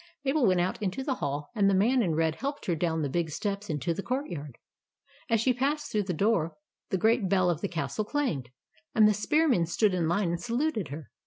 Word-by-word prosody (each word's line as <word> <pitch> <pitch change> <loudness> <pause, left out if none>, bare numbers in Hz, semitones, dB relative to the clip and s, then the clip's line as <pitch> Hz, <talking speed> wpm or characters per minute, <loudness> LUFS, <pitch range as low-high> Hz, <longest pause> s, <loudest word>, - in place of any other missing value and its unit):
Mabel 270 -3 +3
went 185 -2 +3
out 180 +4 -1
into 205 +6 -2
the 270 - 0
hall; 145 0 -3
and 205 -4 +3
the 195 - +3
man 240 +7 +3
in 170 -7 0
red 160 0 +1
helped 285 +2 -4
her 175 - +1
down 160 -1 0
the - - 0
big 165 +3 -1
steps 200 +5 -3
into 155 +2 -1
the 180 - -4
courtyard. 175 - -4 0.7
As 230 - +3
she 255 +3 +3
passed 285 +4 -1
through 210 -2 0
the 185 - -2
door, 185 -3 +1 0.3
the 190 - +1
great 220 0 +2
bell 185 -2 +3
of 160 - -4
the 200 - 0
castle 175 +4 -2
clanged, 210 - -2 0.5
and 215 -1 +7
the 210 - +4
spearmen 230 - +2
stood 200 +3 +2
in 175 -3 +1
line 175 +2 +1
and 170 - -3
saluted 240 - -1
her. 145 0 -8
195 Hz, 225 wpm, -28 LUFS, 165-235 Hz, 0.7 s, and